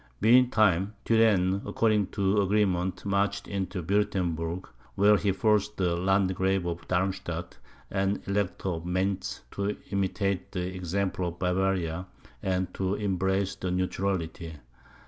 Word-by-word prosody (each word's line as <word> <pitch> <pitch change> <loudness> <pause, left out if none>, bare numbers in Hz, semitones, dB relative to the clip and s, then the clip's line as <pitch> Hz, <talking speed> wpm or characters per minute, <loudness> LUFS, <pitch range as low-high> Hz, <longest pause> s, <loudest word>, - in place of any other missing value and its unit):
Meantime, 110 -4 +4
Turenne, 100 -4 +3
according 105 -4 +1
to 100 0 +1
agreement, 95 -3 +1
marched 100 0 0
into 95 -2 -3
Wuertemberg, 90 -3 -1 0.3
where 105 +1 +5
he 100 0 +1
forced 105 +2 +1
the 90 -2 +1
Landgrave 95 0 +1
of 85 0 -4
Darmstadt 90 -2 -2 0.3
and 95 0 +1
the - - -5
Elector 100 -1 -1
of 80 -2 -3
Mentz 95 +1 -1
to 100 +1 -2
imitate 100 -1 -1
the 90 0 -3
example 95 0 -1
of 85 0 -6
Bavaria, 90 -1 0 0.3
and 95 -1 -1
to 95 +1 -1
embrace 95 -1 0
the 95 -2 -4
neutrality. 90 -3 -2
95 Hz, 125 wpm, -28 LUFS, 90-100 Hz, 0.3 s, where